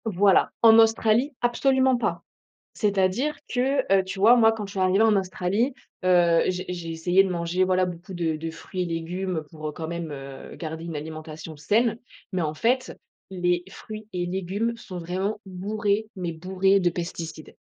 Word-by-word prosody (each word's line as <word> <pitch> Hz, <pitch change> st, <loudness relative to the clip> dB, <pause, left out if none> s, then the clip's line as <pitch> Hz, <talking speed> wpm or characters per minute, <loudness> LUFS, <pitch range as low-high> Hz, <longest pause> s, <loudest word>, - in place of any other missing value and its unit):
Voilà. 200 Hz, -2 st, +3 dB
En 225 Hz, -1 st, +8 dB
Australie, 225 Hz, +4 st, +3 dB
absolument 260 Hz, +1 st, +3 dB
pas. 240 Hz, -, -2 dB, 0.5 s
C'est-à-dire 205 Hz, +7 st, +1 dB, 0.2 s
que 265 Hz, +2 st, +2 dB
heu, 195 Hz, -1 st, +4 dB
tu 190 Hz, +1 st, -6 dB
vois, 225 Hz, +5 st, +7 dB
moi, 225 Hz, -2 st, +6 dB
quand 220 Hz, -2 st, -4 dB
je 195 Hz, -, -10 dB
suis 195 Hz, -, -4 dB
arrivée 185 Hz, +2 st, +3 dB
en 220 Hz, -1 st, +5 dB
Australie, 195 Hz, +6 st, 0 dB, 0.3 s
heu, 175 Hz, -2 st, +4 dB
j'ai 185 Hz, 0 st, -2 dB
j'ai 175 Hz, -2 st, -5 dB
essayé 175 Hz, +4 st, +3 dB
de 195 Hz, -, -2 dB
manger, 175 Hz, +1 st, 0 dB
voilà, 185 Hz, 0 st, +2 dB
beaucoup 180 Hz, +2 st, -7 dB
de 165 Hz, -2 st, 0 dB
de 165 Hz, +1 st, -5 dB
fruits 180 Hz, +3 st, -6 dB
et -, -, -3 dB
légumes 170 Hz, +1 st, -3 dB
pour, 155 Hz, -2 st, -6 dB
heu, -, -, -3 dB
quand 160 Hz, +1 st, -6 dB
même, 170 Hz, -1 st, -4 dB
heu, 135 Hz, -1 st, -9 dB
garder 160 Hz, 0 st, -6 dB
une 165 Hz, -2 st, -5 dB
alimentation 155 Hz, +1 st, -7 dB
saine. 220 Hz, +9 st, +1 dB, 0.3 s
Mais, 185 Hz, -2 st, -1 dB
en 155 Hz, -1 st, -1 dB
fait, 250 Hz, +9 st, 0 dB, 0.4 s
les 175 Hz, -1 st, 0 dB
fruits 215 Hz, +2 st, -9 dB
et 175 Hz, -1 st, -1 dB
légumes 190 Hz, +5 st, -2 dB
sont 185 Hz, -6 st, -8 dB
vraiment 190 Hz, +5 st, -2 dB
bourrés, 205 Hz, +3 st, -1 dB
mais 180 Hz, -3 st, -3 dB
bourrés 190 Hz, +4 st, +2 dB
de 180 Hz, -2 st, +2 dB
pesticides. 165 Hz, -2 st, -6 dB
185 Hz, 180 wpm, -25 LUFS, 170-215 Hz, 0.5 s, En